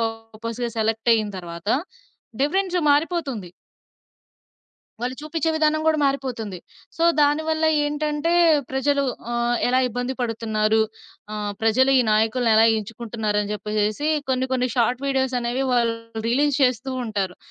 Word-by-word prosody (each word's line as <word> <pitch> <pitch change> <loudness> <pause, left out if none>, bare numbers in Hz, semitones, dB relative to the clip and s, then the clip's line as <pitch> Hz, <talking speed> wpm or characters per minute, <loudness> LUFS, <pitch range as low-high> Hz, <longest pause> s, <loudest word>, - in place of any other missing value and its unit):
పర్పస్‌గా 225 +1 -4
సెలెక్టయ్యిన 225 -1 +1
తరవాత 170 +2 -8 0.7
డిఫరెన్సు 365 +3 +1
మారిపోతుంది. 290 - -1 1.5
వాళ్ళు 250 +2 -2
చూపిచ్చే 320 +1 -1
విధానం 310 0 +2
గూడా 315 -1 +3
మారిపోతుంది. 250 -8 -2 0.4
సో, 330 - -2 0.2
దానివల్ల 315 +2 +2 0.2
ఏంటంటే, 300 +2 -1 0.4
ప్రజలు 280 +1 +1 0.3
ఆహ్, 240 0 +1
ఎలా 255 +1 +3
ఇబ్బంది 245 +3 -3
పడుతున్నారు? 220 -2 0 0.5
ఆహ్, 210 -1 -3
ప్రజలు 255 +5 +3
ఈ - - +5
నాయకులనెలా 225 0 +3
ఎంచుకుంటున్నారని 215 -1 -3
చెప్పేసెసి 210 +7 -1 0.2
కొన్ని, 260 0 +1
కొన్ని 250 -1 +1
షార్ట్ 245 +3 +1
వీడియోస్ 265 -1 0
అనేవి 240 +3 -1
వాళ్ళు 235 -2 +2 0.3
రిలీజ్ 280 +3 +2
చేస్తూ 255 +1 +1
ఉంటారు. 200 -5 -3
245 Hz, 115 wpm, -23 LUFS, 220-280 Hz, 1.5 s, ఈ